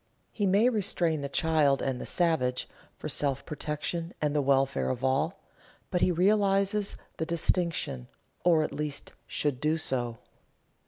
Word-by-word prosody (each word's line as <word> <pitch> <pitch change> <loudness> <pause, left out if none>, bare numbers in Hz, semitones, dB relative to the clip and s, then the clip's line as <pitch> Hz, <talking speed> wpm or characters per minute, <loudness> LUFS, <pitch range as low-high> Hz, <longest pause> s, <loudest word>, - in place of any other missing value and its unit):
He 205 -3 0
may 200 +5 +4
restrain 175 - +1
the 140 - -4
child 150 -3 +3
and 130 -2 -2
the - - -6
savage, 160 -8 +1 0.3
for - - -5
self 140 -2 0
protection 155 +3 -4
and 150 -1 0
the 145 - +3
welfare 135 0 +2
of 130 0 -3
all, 135 +8 0 0.5
but 180 - 0
he - - +4
realizes 200 +2 +2 0.2
the 160 - -1
distinction, 165 -6 -1 0.4
or 165 -3 +4
at - - -4
least 150 -2 -4
should 140 -3 -1
do 155 +1 +2
so. 120 -6 -2
155 Hz, 150 wpm, -29 LUFS, 135-180 Hz, 0.5 s, may